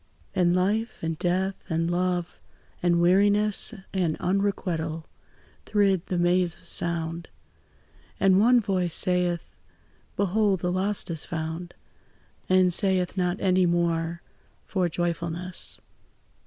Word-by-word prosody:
And 175 -1 +2
life, 210 +4 -1
and 165 0 -1
death, 185 +2 0 0.2
and 165 +1 0
love, 180 -1 -1 0.4
and 175 -1 +2
weariness, 205 +5 +4 0.2
And 175 -5 0
unrequital, 180 -4 -1 0.6
thrid 200 -4 +2
the 180 - -2
maze 175 0 +2
of - - -21
sound; 170 0 -2 0.9
And 190 -1 +4
one 240 +3 +5
voice 185 -5 -1
saith, 180 -2 0 0.6
"Behold, 200 -1 +1
the 180 - 0
lost 190 0 -1
is 160 -2 -3
found!" 165 +1 -5 0.7
And 185 -1 +5
saith 185 -1 +1
not 180 -1 -1
any 185 -1 +3
more 170 -1 0 0.4
for 185 -3 0
joyfulness. 170 +1 -3
180 Hz, 115 wpm, -26 LUFS, 170-190 Hz, 0.9 s, one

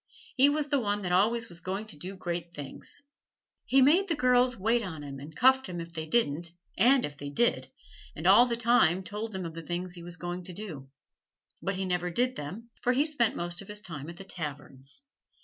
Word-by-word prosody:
He 275 +1 +6
was 295 0 0
the 285 -2 +3
one 205 -3 -1
that 180 - -2
always 230 +6 +3
was 170 -4 -9
going 190 +4 -3
to 215 - -9
do 185 +6 -7
great 170 -2 -4
things. 145 - -6 0.6
He 265 0 +6
made 345 +9 +5
the 335 - +1
girls 250 -2 +3
wait 225 +5 +2
on 165 -8 -6
him 140 -1 -7
and 150 +3 -10
cuffed 265 0 +5
them 175 -2 -5
if 170 0 -7
they 160 -1 -4
didn't, 170 -5 +1 0.3
and 255 +2 +5
if 145 - -7
they 145 -1 -6
did, 235 +12 +1 0.5
and - - -7
all 210 +7 +8
the 235 - +1
time 230 -7 +3
told 210 +2 -5
of 175 -3 -4
the 165 - -6
things 175 +2 -4
he 175 - -7
was 175 +1 -8
going 175 +1 -4
to 180 - -6
do. 165 -9 -7 0.7
But 195 - -1
he 190 0 -2
never 180 -1 0
did 250 +8 +1
them, 200 +11 -7
for 250 - +2
he 280 +4 +3
spent 290 -8 +1
most 175 0 -3
of 200 - -11
his 210 0 -4
time 165 -7 -7
at 170 - -9
the 195 - -8
taverns. 145 - -6
190 Hz, 220 wpm, -29 LUFS, 170-240 Hz, 0.7 s, all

